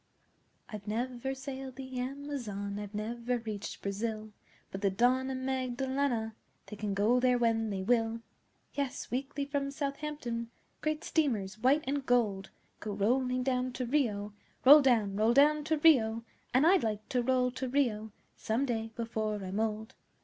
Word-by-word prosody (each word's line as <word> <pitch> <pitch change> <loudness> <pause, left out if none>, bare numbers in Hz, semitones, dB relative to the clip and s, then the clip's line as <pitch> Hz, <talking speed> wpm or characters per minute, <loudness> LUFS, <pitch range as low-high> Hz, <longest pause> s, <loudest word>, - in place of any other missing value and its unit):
I'VE 210 -1 -8
never 245 +4 -2
sailed 265 -1 -7
the 260 -1 -6
Amazon, 250 -7 -4
I've 205 0 -7
never 235 +3 -2
reached 215 -3 -6
Brazil; 215 +2 -3 0.4
But 195 - -6
the 200 - +3
Don 250 +6 +2
and 260 0 -3
Magdelana, 260 -2 -1 0.3
They 210 - -8
can 205 -1 -3
go 220 +5 +3
there 250 0 +3
when 225 -2 +1
they 190 -2 -3
will! 230 +1 +1 0.5
Yes, 280 -2 -3
weekly 275 +3 -2
from 280 -1 -2
Southampton, 275 -4 -4 0.3
Great 310 0 -1
steamers, 215 - 0
white 270 +6 +3
and 280 +1 -1
gold, 215 -7 +1 0.3
Go 210 - -4
rolling 250 +5 +1
down 255 -1 0
to 250 0 -3
Rio 220 -6 0 0.3
(Roll 295 +3 +10
down 220 -7 +2
roll 220 +2 +3
down 300 +2 +5
to 315 0 +1
Rio!) 230 -8 +4 0.3
And 260 +4 +4
I'd 365 +2 +5
like 215 -1 -2
to 250 - +1
roll 250 0 +2
to 260 0 -4
Rio 225 -6 0 0.2
Some 230 +5 -1
day 225 -3 -2
before 220 -2 -2
I'm 190 +2 -3
old! 220 0 -2
245 Hz, 155 wpm, -31 LUFS, 215-265 Hz, 0.5 s, Roll